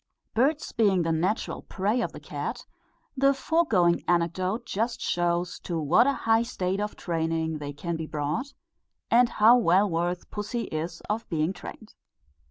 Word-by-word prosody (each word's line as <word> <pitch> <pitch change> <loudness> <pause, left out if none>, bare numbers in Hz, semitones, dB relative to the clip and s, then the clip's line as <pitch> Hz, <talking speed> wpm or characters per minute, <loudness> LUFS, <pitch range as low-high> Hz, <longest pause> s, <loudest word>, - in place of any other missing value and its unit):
Birds 285 +7 +1
being 195 -6 +2
the 165 - 0
natural 175 +7 -1
prey 210 +6 -1
of - - -2
the - - -10
cat, - - -5 0.5
the 275 +1 +3
foregoing 245 - +2
anecdote 185 +6 0
just 230 +4 -2
shows 175 0 -1
to 170 -2 -3
what 175 - +4
a 280 - +3
high 225 0 +4
state 190 -4 -2
of 210 0 -3
training 160 -2 -2
they 145 -1 -5
can 170 +4 -4
be 160 -1 -5
brought, 155 - -3 0.6
and 240 +1 +5
how 225 +3 +6
well 200 -3 +4
worthy 175 0 -1
pussy 215 +3 -3
is 165 +2 -4
of 220 +2 -4
being 160 +2 0
trained. 180 - -10
185 Hz, 160 wpm, -27 LUFS, 165-225 Hz, 0.6 s, how